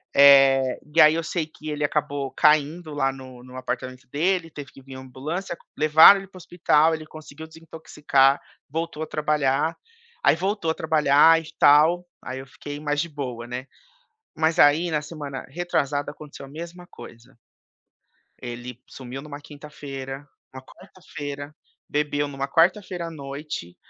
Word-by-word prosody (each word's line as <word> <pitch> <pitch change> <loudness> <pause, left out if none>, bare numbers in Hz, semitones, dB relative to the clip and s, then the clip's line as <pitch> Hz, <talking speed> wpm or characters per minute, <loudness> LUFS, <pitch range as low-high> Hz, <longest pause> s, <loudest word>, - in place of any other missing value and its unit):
Eh, 135 -2 +6 0.2
e 165 - +7
aí, 155 +1 +7
eu 165 - -2
sei 160 0 -3
que 155 0 -10
ele 150 0 -3
acabou 145 -2 -2
caindo 155 +2 +2
lá 135 -2 0
no 130 -2 -12
no 125 0 -13
apartamento 130 0 -6
dele, 175 +3 0
teve 145 -4 -9
que 135 - -16
vim 135 0 -12
a - - -8
ambulância. 150 +8 -6 0.2
Levaram 155 +6 +8
ele 195 - -11
para 190 - -15
o - - -10
hospital, 160 -2 +2
ele 160 -1 -5
conseguiu 155 0 -11
desintoxicar, 150 -4 0 0.3
voltou 165 +1 -4
a - - -6
trabalhar. 150 +1 0 0.5
Aí, - - +5
voltou 190 -1 -1
a - - -1
trabalhar 160 0 +4
e 160 - -13
tal. 160 +5 +5 0.2
Aí, 130 0 -6
eu 135 - -10
fiquei 145 +2 -9
mais 145 -1 -1
de 170 - -5
boa, 125 -6 -6
né. 125 +1 -6 0.7
Mas 160 +1 +1
aí, 155 +4 +5
na 150 -1 0
semana 145 -3 -7
retrasada 145 -2 -2
aconteceu 145 -1 -12
a - - -14
mesma 170 +4 -9
coisa. 120 +3 -14 1.1
Ele 120 0 -8
sumiu 130 +1 -9
numa 145 0 -9
quinta-feira, 145 -2 -9 0.3
numa 130 - -9
quarta-feira. 145 -4 -9 0.3
Bebeu 145 0 -1
numa 135 -1 -4
quarta-feira 175 +3 +1
à - - -7
noite. 140 - -7
150 Hz, 160 wpm, -24 LUFS, 135-160 Hz, 1.1 s, Levaram